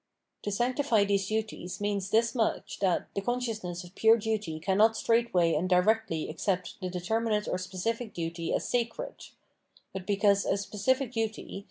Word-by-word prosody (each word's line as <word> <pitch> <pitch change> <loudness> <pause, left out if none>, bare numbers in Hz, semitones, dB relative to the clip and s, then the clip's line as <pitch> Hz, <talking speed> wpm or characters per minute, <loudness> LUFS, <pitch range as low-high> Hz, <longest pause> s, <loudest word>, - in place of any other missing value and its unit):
To 205 - -3
sanctify 240 0 +2
these 200 -1 +1
duties 215 -4 -3
means 200 -2 -1
this 230 +2 +3
much, 230 -4 -1
that 190 -3 +1
the 200 - -2
consciousness 220 -7 -3
of 175 0 -13
pure 225 +2 +5
duty 210 -7 -2
cannot 205 +6 +3
straightway 230 -8 +2
and 165 +4 0
directly 180 -2 +2
accept 180 +4 -2
the 185 - -2
determinate 210 +4 -1
or 180 - -1
specific 210 +5 -3
duty 165 0 -3
as - - 0
sacred; 245 - -2 0.7
but 190 -1 -6
because 200 -1 +3
a - - +1
specific 220 +6 0
duty. 220 -3 -3
205 Hz, 155 wpm, -29 LUFS, 185-225 Hz, 0.7 s, pure